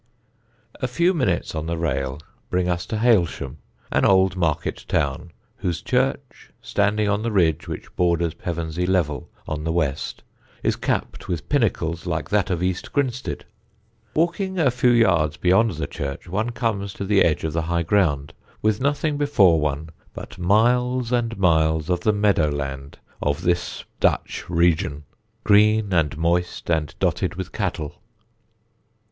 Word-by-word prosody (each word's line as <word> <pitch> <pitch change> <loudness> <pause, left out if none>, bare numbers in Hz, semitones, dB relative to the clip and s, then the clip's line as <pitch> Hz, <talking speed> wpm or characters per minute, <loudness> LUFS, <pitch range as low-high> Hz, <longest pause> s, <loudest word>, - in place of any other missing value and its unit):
A 130 - +1
few 170 +9 +2
minutes 125 - 0
on 80 0 -3
the 85 0 -2
rail 70 -4 -2 0.3
bring 90 0 0
us 90 0 -1
to 110 - -2
Hailsham, 90 - +1 0.3
an - - +2
old 95 -1 +4
market 85 -5 -1
town, 70 +4 -1 0.3
whose 90 -8 -2
church, - - -1
standing 105 +1 +1
on 105 +1 +1
the 115 +1 -1
ridge 85 -7 +2
which - - -7
borders 85 -2 +1
Pevensey 85 0 -3
Level 85 -6 0 0.2
on 75 -1 -3
the 80 - -1
west, 75 -4 -2 0.4
is - - +2
capped - - -3
with 80 -5 -3
pinnacles 90 - 0
like 85 +2 -3
that 105 -3 +2
of 90 -1 -1
East 90 0 -2
Grinstead. 130 -3 -2 0.7
Walking 180 +4 0
a 150 -7 +3
few 125 0 +2
yards 90 -10 +3
beyond 95 +5 +3
the 80 - -3
church 70 +1 -5
one 105 +7 -1
comes 115 -5 -2
to 100 - -4
the 100 0 +3
edge 80 - +1
of 80 -1 -2
the 80 - 0
high 85 -1 +1
ground, 75 -6 +1 0.3
with 110 +1 +1
nothing 145 +2 0
before 100 - +4
one 75 +1 -2 0.2
but - - -9
miles 120 +6 +2
and 115 -2 0
miles 80 -2 +2
of 90 - +1
the 110 - +2
meadow 100 -7 +2
land 70 -1 -5 0.2
of 75 0 -1
this 90 0 -1
Dutch - - 0
region, 85 -4 +1 0.4
green 105 -1 +4
and 80 -4 +1
moist 85 +1 0
and 80 -3 0
dotted - - 0
with - - -5
cattle. 75 -2 -4
90 Hz, 155 wpm, -23 LUFS, 80-110 Hz, 0.7 s, old